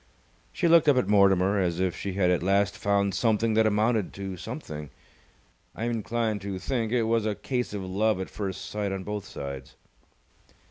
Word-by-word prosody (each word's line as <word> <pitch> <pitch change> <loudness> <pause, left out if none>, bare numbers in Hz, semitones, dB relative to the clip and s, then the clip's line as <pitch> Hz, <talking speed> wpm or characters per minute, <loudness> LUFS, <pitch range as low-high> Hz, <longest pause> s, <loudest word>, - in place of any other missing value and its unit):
She 175 - 0
looked 165 -2 +6
up 140 - +4
at 125 - +2
Mortimer 100 -1 +4
as 90 -2 0
if 95 -2 0
she 100 - -4
had 90 -2 +2
at 90 - +1
last 100 +3 +2
found 100 -3 +1
something 110 +2 +1
that 110 0 +4
amounted 110 0 +1
to 95 -1 -5
something. 85 - -7 0.9
I 115 - -3
am 120 - 0
inclined 115 -1 -1
to 100 -1 -4
think 115 +2 -2
it 120 -2 +2
was 115 -1 +1
a 105 - -1
case 125 +1 -3
of 100 -2 -4
love 100 +2 0
at 95 - -3
first 95 -3 -5
sight 105 -2 -3
on 95 -1 -4
both 105 0 -4
sides. 70 -1 -7
100 Hz, 190 wpm, -27 LUFS, 95-115 Hz, 0.9 s, looked